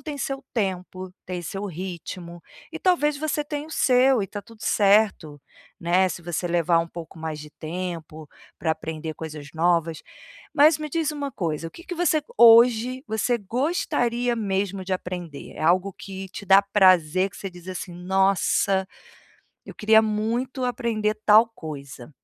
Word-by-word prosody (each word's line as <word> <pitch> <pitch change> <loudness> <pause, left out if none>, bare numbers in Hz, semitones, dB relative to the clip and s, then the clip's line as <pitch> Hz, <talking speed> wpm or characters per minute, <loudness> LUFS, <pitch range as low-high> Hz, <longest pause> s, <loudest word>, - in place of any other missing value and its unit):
tem 300 -2 -6
seu 275 -1 -4
tempo, 185 -3 -3
tem 180 -1 -4
seu 195 +4 -5
ritmo, 175 -1 -7 0.3
e - - -6
talvez 300 -6 +2
você 300 0 -1
tenha 295 0 -5
o 320 - -14
seu 255 -4 +3
e 195 - -5
tá 205 - -6
tudo 230 0 -18
certo, 200 -8 +2 0.4
né, 180 +2 +3
se 175 - -7
você 175 +1 -3
levar 170 -1 +2
um 165 - 0
pouco 165 -1 -10
mais 155 -1 -5
de 150 - -11
tempo 160 -2 -6 0.3
pra 160 0 -1
aprender 160 0 -4
coisas 150 -2 -8
novas. 165 -1 +1 0.5
Mas 305 +2 +6
me 305 - -5
diz 315 +1 -1
uma 285 -2 -5
coisa, 165 - -3
o - - -19
que 340 - -13
que 360 - -6
você 340 -3 +2 0.2
hoje 235 +2 +6
você 220 +3 +1
gostaria 245 - -1
mesmo 195 -2 -2
de 190 - -4
aprender? 180 -5 -5
É - - -6
algo 185 +3 +2
que 190 0 -8
te 200 +1 -9
dá 195 +1 +7
prazer, 185 -3 +4
que - - -14
você 195 - -6
diz, 175 -1 -14
assim: 185 -1 -6
"Nossa! 190 0 +2 0.8
Eu - - -9
queria 220 +1 +5
muito 230 +5 -2
aprender 230 -4 -1
tal 220 +2 +7
coisa". 140 - -9
195 Hz, 165 wpm, -24 LUFS, 170-240 Hz, 0.8 s, dá